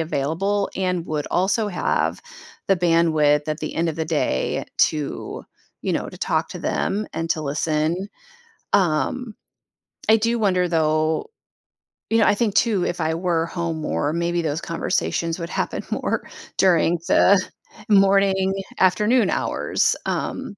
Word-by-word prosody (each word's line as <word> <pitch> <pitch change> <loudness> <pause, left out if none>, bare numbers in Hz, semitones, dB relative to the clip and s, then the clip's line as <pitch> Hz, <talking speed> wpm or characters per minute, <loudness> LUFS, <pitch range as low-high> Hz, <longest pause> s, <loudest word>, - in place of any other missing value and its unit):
available 165 +7 -1
and 180 -2 -1
would 150 -2 -2
also 200 +4 +1
have 180 - -1 0.5
the 195 - +4
bandwidth 160 -4 +3
at 155 0 -2
the 155 - -4
end 165 +1 0
of 160 - -2
the 160 - -1
day 155 - -1
to, 150 -2 -1 0.4
you - - -1
know, - - -2
to - - -12
talk - - 0
to - - -6
them 205 +2 -1
and 165 0 -4
to 160 - +1
listen. 155 +5 -1 0.7
Um, 200 +7 +1 0.7
I 220 - +7
do 230 +2 0
wonder 185 -4 +2
though 160 - +1 0.8
you 225 - +4
know, 215 - +4
I - - +4
think 215 -3 0
too, 210 -6 +2
if 175 - -3
I 160 0 0
were 170 -1 0
home 165 -1 -3
more, 150 -1 -1
maybe 170 +1 0
those 155 -1 -2
conversations 165 0 -2
would 170 0 -5
happen - - -2
more - - -1 0.3
during 175 -2 +3
the 200 -1 +5 0.5
morning, 195 -1 +4 0.3
afternoon 210 +6 +3
hours, - - 0
um, 265 -6 -3
175 Hz, 145 wpm, -22 LUFS, 160-195 Hz, 0.8 s, I